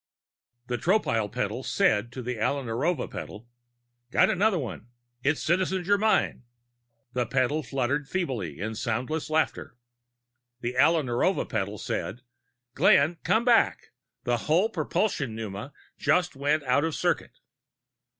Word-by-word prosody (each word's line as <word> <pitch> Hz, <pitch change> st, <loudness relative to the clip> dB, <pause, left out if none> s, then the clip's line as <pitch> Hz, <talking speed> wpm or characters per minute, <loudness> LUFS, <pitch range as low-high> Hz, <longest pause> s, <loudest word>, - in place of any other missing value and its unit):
The 120 Hz, -1 st, -3 dB
Tropile 115 Hz, -, +1 dB
petal 110 Hz, 0 st, -2 dB
"said" 120 Hz, -, +1 dB
to 130 Hz, -, -6 dB
the 125 Hz, -1 st, -4 dB
Alla 140 Hz, +6 st, 0 dB
Narova 130 Hz, +6 st, -1 dB
petal: 110 Hz, +3 st, -8 dB, 0.6 s
"Got -, -, +4 dB
another 200 Hz, +1 st, +2 dB
one! 125 Hz, -5 st, -5 dB, 0.4 s
It's 145 Hz, +2 st, +1 dB
Citizen 185 Hz, +2 st, +1 dB
Germyn!" 205 Hz, -, +2 dB, 0.7 s
The 125 Hz, -2 st, 0 dB
petal 130 Hz, +5 st, +1 dB
fluttered 135 Hz, +1 st, -1 dB
feebly 120 Hz, -, -3 dB
in 110 Hz, +3 st, -3 dB
soundless 125 Hz, +8 st, -2 dB
laughter. 155 Hz, -6 st, -1 dB, 0.8 s
The 120 Hz, +1 st, -3 dB
Alla 160 Hz, +4 st, +4 dB
Narova 130 Hz, +10 st, 0 dB
petal 105 Hz, -2 st, -2 dB
"said": 115 Hz, +4 st, -4 dB, 0.5 s
"Glenn, 155 Hz, +7 st, +4 dB
come 225 Hz, +2 st, +2 dB
back! 240 Hz, -2 st, +3 dB, 0.3 s
The 120 Hz, 0 st, +1 dB
whole 180 Hz, +8 st, +4 dB
propulsion 155 Hz, -, -1 dB
pneuma 110 Hz, +3 st, -6 dB, 0.3 s
just 180 Hz, -3 st, +2 dB
went 145 Hz, +2 st, +1 dB
out 135 Hz, +2 st, +2 dB
of 160 Hz, -1 st, -1 dB
circuit!" -, -, -1 dB
135 Hz, 130 wpm, -27 LUFS, 120-170 Hz, 0.8 s, Got